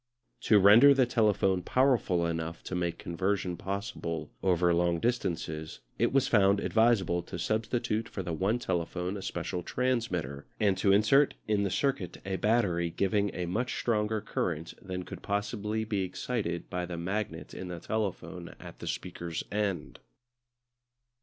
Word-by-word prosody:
To 110 - +8
render 110 +8 +8
the 130 -1 +4
telephone 105 -6 +2
powerful 120 -7 +2
enough 85 0 -3
to - - -6
make 85 -2 -1
conversation 95 +1 -1
possible 95 -3 -4
over 90 -2 +3
long 85 0 +2
distances 80 -8 -2 0.2
it - - +3
was 135 -1 +3
found 100 -2 +4
advisable 110 -7 +2
to 85 - -7
substitute 110 +3 -1
for 95 - -5
the 85 -2 -3
one 95 +8 +1
telephone 90 -3 -2
a 100 - -5
special 90 - -3
transmitter, 90 - -2
and 100 -3 +3
to 100 - +4
insert 110 +8 +4
in 105 -1 +2
the 100 - +1
circuit 110 -5 -1
a 95 -1 -2
battery 95 -7 +2
giving 100 +4 +1
a 90 - -2
much 115 +9 -2
stronger 110 -2 0
current 85 -5 -3
than 90 -1 -5
could - - -8
possibly 105 +1 -2
be 105 -3 -1
excited 95 -1 -3
by 90 0 -3
the 85 -1 -5
magnet 95 0 -3
in 95 - -6
the 90 -1 -6
telephone 95 -4 -4
at - - -11
the - - -7
speaker's 85 -2 -4
end. 100 -6 -2
95 Hz, 155 wpm, -30 LUFS, 85-110 Hz, 0.2 s, To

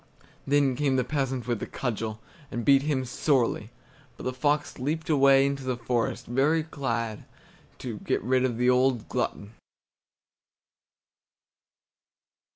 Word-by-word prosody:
Then 140 -2 +3
came 140 0 +1
the 130 - +2
peasant 135 -2 -2
with 120 -4 -1
a - - -3
cudgel, 110 -3 -3 0.3
and 120 -2 -4
beat 135 +1 +6
him 140 -3 -1
sorely; 125 0 0 0.5
but - - -9
the 130 - -2
fox 145 +2 0
leaped 155 +5 -2
away 135 -2 +6
into 140 -1 -2
the 130 -2 -2
forest, 120 0 -1
very 145 +6 +2
glad 115 -8 -3 0.5
to - - -6
get - - -1
rid 130 +2 +2
of 125 -3 0
the 125 +1 +1
old 125 -2 +3
glutton. 100 +1 -3
130 Hz, 135 wpm, -27 LUFS, 120-140 Hz, 0.5 s, beat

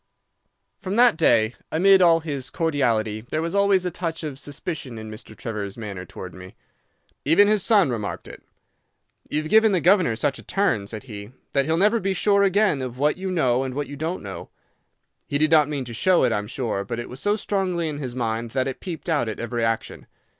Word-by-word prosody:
"From 190 +1 -4
that 240 -4 +5
day, 115 -6 +3 0.2
amid 190 +4 +5
all 165 -2 +5
his 140 -4 -4
cordiality, 115 -10 0
there 125 +7 -4
was 165 +2 -2
always 200 -2 +3
a 180 - -1
touch 165 -1 -4
of 145 -4 -5
suspicion 145 -4 -5
in 110 0 -8
Mr. 110 0 -10
Trevor's 105 -3 -5
manner 100 -5 -6
towards 90 0 -9
me. 95 0 -12 0.7
Even 165 +8 +5
his 210 -1 +3
son 200 - +4
remarked 110 -4 -4
it. - - -11 0.9
'You've 155 +1 -2
given 220 -1 +5
the 185 - +3
governor 180 - +3
such 135 +4 -1
a - - -12
turn,' 195 - 0
said 110 +2 -7
he, 105 -2 -9 0.2
'that 140 - +2
he'll 160 +2 +1
never 210 +5 +3
be 195 -1 -1
sure 200 +1 +3
again 200 -6 +2
of 125 -1 -5
what 150 +4 +1
you 190 0 -3
know 130 -9 +1
and 130 -1 -5
what 145 0 -2
you 145 - -8
don't 160 +5 -4
know.' 100 -1 -8 0.8
He 145 - -1
did 155 +2 +2
not 150 -3 +5
mean 140 -3 -3
to 120 - -8
show 185 +9 +3
it, 125 - +3
I 105 - +1
am 105 - -7
sure, 115 -4 -3
but 115 +4 -5
it 120 - -5
was 125 - -9
so 205 +5 +1
strongly 190 -5 -1
in 150 -2 -4
his 125 -4 -5
mind 115 -1 -2
that 130 - +1
it 135 - -5
peeped 175 -2 -7
out 145 -9 +1
at 110 - -6
every 120 0 -2
action. 115 -1 -2
145 Hz, 220 wpm, -23 LUFS, 115-180 Hz, 0.9 s, that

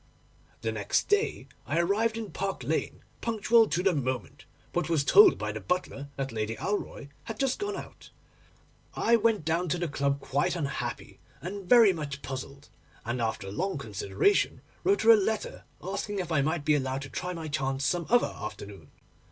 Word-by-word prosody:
'The - - -1
next - - 0
day 415 +1 +1 0.2
I - - -1
arrived 210 +6 +1
at 225 -2 -6
Park 195 0 -3
Lane - - -2 0.2
punctual 225 0 +3
to 180 - -1
the 190 -1 +3
moment, 130 -5 -3 0.3
but 175 0 -1
was 160 -4 +2
told 410 - +7
by - - -3
the - - -5
butler 160 -6 -2
that 135 -1 -3
Lady 110 0 -2
Alroy 195 - -4 0.2
had 225 -1 -6
just 270 +3 0
gone 410 0 -3
out. - - -10 0.9
I 235 - +3
went 220 -6 +2
down 165 +2 0
to 180 - +1
the 175 0 -1
club 140 -1 0
quite 145 +6 0
unhappy 135 -6 -4 0.2
and 190 +1 -7
very 230 -5 +7
much 145 -4 -6
puzzled, 135 +2 -7 0.4
and 120 +1 -2
after 110 -4 -2
long 185 - -2
consideration 105 - 0 0.2
wrote 395 +1 +2
her 230 - +8
a - - +10
letter, 215 +1 -2 0.2
asking 200 +2 -3
if 180 -3 -3
I 155 -3 +3
might 155 +1 -1
be 155 - +4
allowed 135 -1 -1
to 135 - -8
try 180 +7 -4
my 165 -2 -6
chance 135 -1 -1
some 170 +2 0
other 245 +1 +3
afternoon. 100 -2 -8
170 Hz, 180 wpm, -28 LUFS, 135-205 Hz, 0.9 s, a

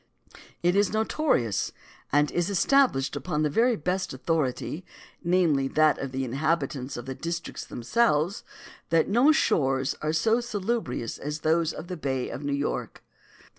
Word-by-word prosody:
It 175 +1 +3
is 205 -1 +3
notorious, 215 - 0 0.4
and 145 +1 +3
is 175 +1 0
established 200 - +3
upon 150 +2 -1
the 150 - +1
very 235 - +3
best 180 -2 -2
authority, 155 +3 -1 0.4
namely, 170 -6 +2
that 155 +2 +3
of 135 -1 -4
the 130 0 -2
inhabitants 140 -1 -1
of 120 - -6
the 135 - -4
districts 170 +4 -5
themselves, 170 - +1 0.5
that 165 -1 +3
no 245 +9 +5
shores 135 - +1
are 155 - 0
so 220 +9 +2
salubrious 225 - -3
as 150 +2 -4
those 160 0 +2
of - - -7
the 180 0 -6
bay 130 -4 -2
of 140 - -6
New 145 - -2
York. 140 +1 -3
155 Hz, 150 wpm, -27 LUFS, 135-190 Hz, 0.5 s, no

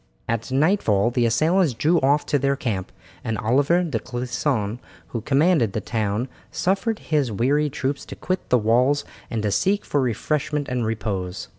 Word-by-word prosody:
At 115 +2 -2
nightfall 130 - +2
the 120 -1 +2
assailants 160 +6 +2
drew 155 +9 +2
off 140 +3 +3
to 145 - +1
their 140 +1 +1
camp, 105 -9 -3 0.3
and 115 -2 -2
Oliver 140 - +2
de 165 - -2
Clisson, 120 -2 -2 0.3
who 115 - -4
commanded 140 - +2
the - - -1
town, 110 +2 -2 0.2
suffered 200 +4 0
his 145 - 0
weary 140 +8 +1
troops 140 0 -3
to - - -7
quit 185 0 -3
the 125 - +5
walls 125 +6 +2 0.2
and 110 -3 -2
to 105 - 0
seek 200 - +1
for 145 - +1
refreshment 145 +4 -1
and 125 -3 -1
repose. 100 -5 -3
130 Hz, 165 wpm, -23 LUFS, 115-150 Hz, 0.3 s, the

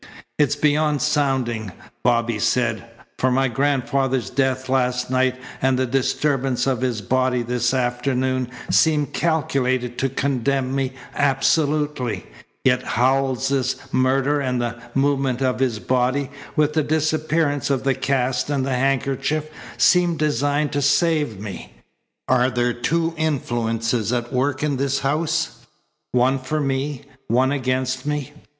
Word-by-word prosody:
"It's 145 -1 +3
beyond 150 0 +2
sounding," 130 -8 0 0.3
Bobby 120 -2 +1
said, 115 +1 0 0.3
"for 130 - +2
my 135 +1 +2
grandfather's 135 0 0
death 130 0 0
last 125 -1 0
night 130 0 +2 0.3
and 130 -1 +2
the 130 - +1
disturbance 135 0 0
of 130 -3 0
his 125 -4 -1
body 130 +3 +1
this 120 0 0
afternoon 130 0 0 0.2
seemed 150 -4 +3
calculated 130 -6 0
to 135 - +1
condemn 135 0 -1
me 135 -1 -1 0.2
absolutely, 140 - +1 0.4
yet 125 -1 +3
Howells's 130 +1 +1 0.2
murder 135 +3 +2
and 125 -2 -1
the 120 0 -3
movement 135 -2 +1
of 130 -1 0
his 125 -4 +1
body, 130 +6 0 0.2
with 150 0 +2
the 155 - +2
disappearance 155 -1 0
of 135 -2 0
the 135 0 +2
cast 130 0 0
and 140 -3 0
the 135 - -1
handkerchief, 135 +3 0 0.3
seem 175 -2 +4
designed 145 0 0
to 145 - -1
save 150 - +2
me. 100 -10 -8 0.5
Are 125 +1 +3
there 120 -1 0
two 165 +7 0
influences 120 -6 -1
at 120 0 -2
work 130 +2 0
in 145 -3 0
this 135 0 0
house 150 +4 -1 0.5
one 130 +2 +2
for 130 +4 -2
me, 135 -1 -2 0.2
one 130 +4 +2
against 130 -1 -1
me?" 150 -1 -2
130 Hz, 130 wpm, -22 LUFS, 125-145 Hz, 0.5 s, seem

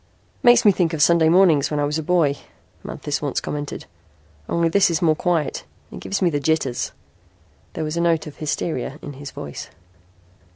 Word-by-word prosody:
"Makes 240 -2 +5
me 205 - +8
think 175 -3 0
of 155 - -2
Sunday 170 -2 +4
mornings 165 -5 +4
when 150 - -2
I - - +1
was 150 +2 -1
a - - -2
boy," 155 -3 +2 0.5
Manthis - - -4
once - - -1
commented. 145 0 -5 0.6
"Only 170 0 +1
this 185 +3 +3
is 165 -3 0
more 160 -3 +3
quiet. 165 -3 -1 0.3
It - - -8
gives 195 0 -3
me 175 - +3
the 145 - -1
jitters." 140 -4 -1 0.8
There - - -4
was 155 +2 -3
a - - +1
note 170 -2 +1
of 150 - -10
hysteria 150 -2 -3
in 145 - -7
his 140 +1 -9
voice. 70 - -8
160 Hz, 190 wpm, -21 LUFS, 145-170 Hz, 0.8 s, me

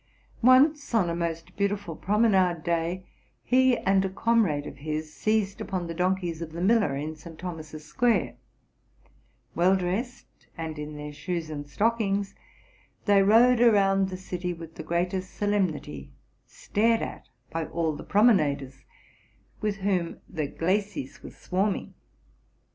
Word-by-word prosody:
Once, 265 +2 +4
on 180 -6 +3
a - - -2
most 165 -1 -4
beautiful 200 -4 -1
promenade 190 -4 +2
day, 170 +2 -1 0.4
he 255 -1 +4
and 195 0 +2
a 190 - -1
comrade 190 -8 +1
of 135 - -8
his 155 +1 -4
seized 215 -2 0
upon 185 -4 -3
the 165 - -5
donkeys 180 -1 -1
of 160 -1 -6
the 170 - -6
miller 200 -7 +3
in 155 +3 -4
St. 160 +1 -12
Thomas's 155 -3 -7
square: 235 +10 +1 1.2
well 180 +3 +4
dressed, 195 +7 -4
and 160 -2 -5
in 150 0 -6
their 150 0 -7
shoes 170 0 -4
and 145 -1 -6
stockings, 205 +1 0 0.7
they 200 -1 +5
rode 230 +4 +5
around 195 -4 +4
the 185 - -5
city 180 -1 -4
with 165 -1 -10
the - - -8
greatest 180 +2 -2
solemnity, 185 - -1 0.4
stared 225 +2 +1
at - - -7 0.2
by 165 0 -2
all 160 -2 -1
the - - -8
promenaders, 145 - +2 0.8
with 210 -1 -1
whom 190 -4 -1
the 155 -3 -3
glacis 185 -1 -2
was - - -11
swarming. 190 +2 -1
185 Hz, 140 wpm, -27 LUFS, 160-205 Hz, 1.2 s, they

